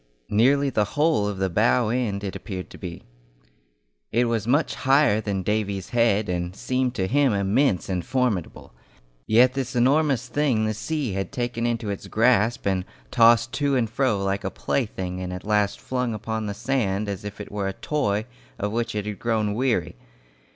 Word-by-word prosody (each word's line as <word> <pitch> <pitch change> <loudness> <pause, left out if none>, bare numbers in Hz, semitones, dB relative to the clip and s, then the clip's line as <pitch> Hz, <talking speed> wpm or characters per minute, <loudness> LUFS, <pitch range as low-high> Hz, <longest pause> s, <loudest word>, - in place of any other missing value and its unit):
Nearly 135 +6 +3
the 110 -3 +2
whole 150 -9 +3
of 100 -2 -3
the 95 0 +1
bow 110 +5 +2
end 110 -4 -1
it 100 - -4
appeared 95 -4 -6
to - - -12
be. 85 -2 -7 1.1
It 120 +2 +2
was 115 -2 -1
much 145 +6 +2
higher 135 -5 +3
than 100 -3 -2
Davy's 100 -2 -1
head, 115 -3 +2
and 90 0 -3
seemed 130 +1 -1
to 95 - 0
him 135 +3 +2
immense 100 +1 +1
and 90 -2 -2
formidable; 120 - -2 0.5
yet 125 +3 +5
this 135 -1 -3
enormous 130 0 +2
thing 130 -6 +1
the 110 - 0
sea 125 +4 -2
had 95 0 -3
taken 120 -3 -2
into 115 -3 -2
its 100 - -6
grasp 115 0 +2
and 95 -2 +1 0.3
tossed 115 -1 +5
to 140 +2 +1
and 115 -4 0
fro 115 -7 +1
like 95 +1 -1
a - - -1
plaything 95 -7 -3
and 90 0 -4
at 90 +1 -7
last 105 -1 +1
flung 125 -3 -2
upon 110 0 -3
the 100 - -4
sand 110 -4 -1
as 100 -1 -4
if 100 -1 -7
it - - -8
were 100 -1 -2
a 95 - -2
toy 105 -6 -1 0.3
of 105 -2 -2
which 115 0 -2
it 105 -1 -2
had 105 -1 -5
grown 110 -3 0
weary. 115 - 0
110 Hz, 185 wpm, -24 LUFS, 100-125 Hz, 1.1 s, yet